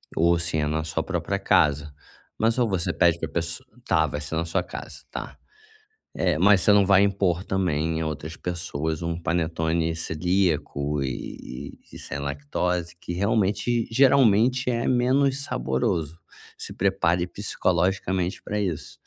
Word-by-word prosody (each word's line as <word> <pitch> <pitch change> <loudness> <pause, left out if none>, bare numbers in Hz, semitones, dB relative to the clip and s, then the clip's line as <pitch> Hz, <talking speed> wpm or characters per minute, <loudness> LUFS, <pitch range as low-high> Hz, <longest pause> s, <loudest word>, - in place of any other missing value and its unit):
ou 85 +1 +3
se 85 -1 0
é 75 -1 +1
na 80 +1 -1
sua 80 +1 -2
própria 95 +2 -2
casa. 75 -5 +2 0.5
Mas 115 +2 +2
ou 120 - +3
você 95 -4 0
pede 85 -1 +3
pra - - -3
pessoa 85 0 -4 0.2
tá, - - +3
vai 75 - -4
ser 75 +2 -4
na 80 +1 0
sua 80 - 0
casa, - - -9
tá, - - -7 0.8
eh, 90 -4 +1
mas 100 0 +5
você 105 - +5
não 100 -1 +5
vai 100 0 +5
impor 95 -3 +1
também 80 -5 0
em 80 - -1
outras 80 +1 -5
pessoas 80 -3 -3
um 85 0 -2
panetone 80 0 0
celíaco, 80 -4 0
e 65 +1 -6 0.2
e - - -12
e - - -8
sem - - -6
lactose, 80 +5 -2
que 85 - -6
realmente, 105 +4 +1
geralmente, 125 -1 +4
é 120 -1 0
menos 130 +2 +2
saboroso. 75 - -1 0.4
Se - - -6
prepare 90 -2 +1
psicologicamente 95 -1 -1
para 105 0 -2
isso. 90 -7 -4
85 Hz, 155 wpm, -25 LUFS, 80-100 Hz, 0.8 s, mas